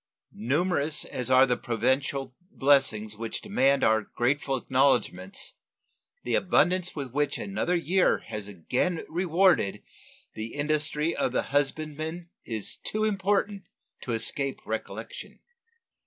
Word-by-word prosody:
Numerous 150 - +1
as 125 0 -3
are 130 +1 +7
the 125 -2 +1
providential 130 +3 -1 0.2
blessings 135 - +2
which 115 +1 -4
demand 140 -10 +2
our 110 0 +4
grateful 135 +5 -1
acknowledgments, 125 -8 0 0.7
the 120 - -2
abundance 180 +3 +2
with 140 -5 -5
which 145 0 0
another 195 -3 -1
year 180 +2 +2
has 105 -2 -6
again 125 - -2
rewarded 175 - +2 0.5
the 110 +1 -6
industry 150 +2 0
of - - -1
the - - -1
husbandman 155 +4 -2
is 110 -3 -2
too 215 0 -2
important 200 -1 0 0.3
to 120 - -3
escape 135 +4 0
recollection. - - -6
145 Hz, 115 wpm, -27 LUFS, 120-175 Hz, 0.7 s, are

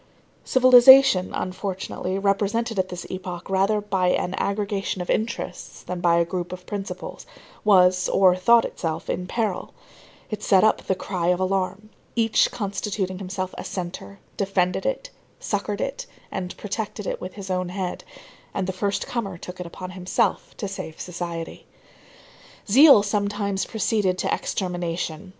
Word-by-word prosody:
Civilization, 255 -5 +7
unfortunately, 185 0 -3
represented 205 +3 0
at 185 0 0
this 180 0 -6
epoch 180 -2 -6
rather 195 +3 +2
by 195 -3 0
an 180 0 +1
aggregation 200 -1 -1
of 180 - -2
interests 225 +2 -3
than 180 -1 -5
by 170 -1 +4
a 170 - +3
group 175 0 -4
of 180 0 -8
principles, 200 - -6 0.4
was 185 -3 +5
or 185 -2 +5
thought 230 +6 +5
itself, 160 -2 -3
in 180 - -3
peril; 210 -2 -2 0.6
it 215 -1 -4
set 190 -3 +4
up 220 - +3
the 190 - +2
cry 185 -1 -3
of 180 0 +2
alarm; 190 +2 -1 0.2
each, 225 -2 +3
constituting 200 -3 -3
himself 185 -1 -4
a - - -5
centre, 185 +2 -6 0.2
defended 195 - 0
it, - - -3 0.3
succored 205 0 -2
it, - - -3 0.2
and 180 -1 -5
protected 210 0 -4
it - - -3
with 185 - -6
his 195 -2 -6
own 185 -1 -1
head; 185 -1 -4 0.5
and 190 - 0
the 190 - -3
first 200 +2 -1
comer 200 -7 -4
took 180 +1 -9
it 180 - -5
upon 185 +2 -8
himself 185 0 -1
to 205 - -3
save 175 -5 -7
society. 170 -2 -6 1.0
Zeal 265 0 +8
sometimes 205 -1 -1
proceeded 210 -4 0
to - - 0
extermination. 175 -1 -3
190 Hz, 150 wpm, -24 LUFS, 180-210 Hz, 1.0 s, Zeal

